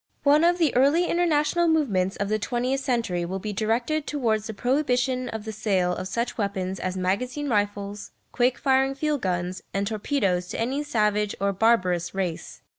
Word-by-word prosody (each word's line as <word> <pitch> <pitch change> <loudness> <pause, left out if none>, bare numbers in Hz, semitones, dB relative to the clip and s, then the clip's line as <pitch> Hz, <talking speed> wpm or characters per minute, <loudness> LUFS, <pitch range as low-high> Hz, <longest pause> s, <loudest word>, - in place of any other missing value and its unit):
One 295 +2 +5
of 350 +1 +4
the 325 -6 +1
early 285 +7 +4
international 340 -1 +2
movements 205 - +1
of 200 - -2
the 215 +1 0
twentieth 250 +4 -1
century 230 -10 -1
will 185 +3 -3
be 210 +2 -4
directed 235 +9 -1
towards 225 -7 0
the 220 - -5
prohibition 255 0 0
of 220 -2 -6
the 220 - -4
sale 190 -4 0
of 185 - -5
such 235 +5 -3
weapons 195 -2 -2
as 185 0 -3
magazine 245 +10 -1
rifles, 205 -3 -2 0.2
quick 245 0 +2
firing 270 0 +2
field 295 -1 -1
guns, 180 0 -2
and 200 0 0
torpedoes 200 -4 0
to - - -5
any 260 +6 -1
savage 210 -6 0
or 200 0 +1
barbarous 185 -5 +1
race. 180 -4 -4
225 Hz, 175 wpm, -25 LUFS, 195-270 Hz, 0.2 s, One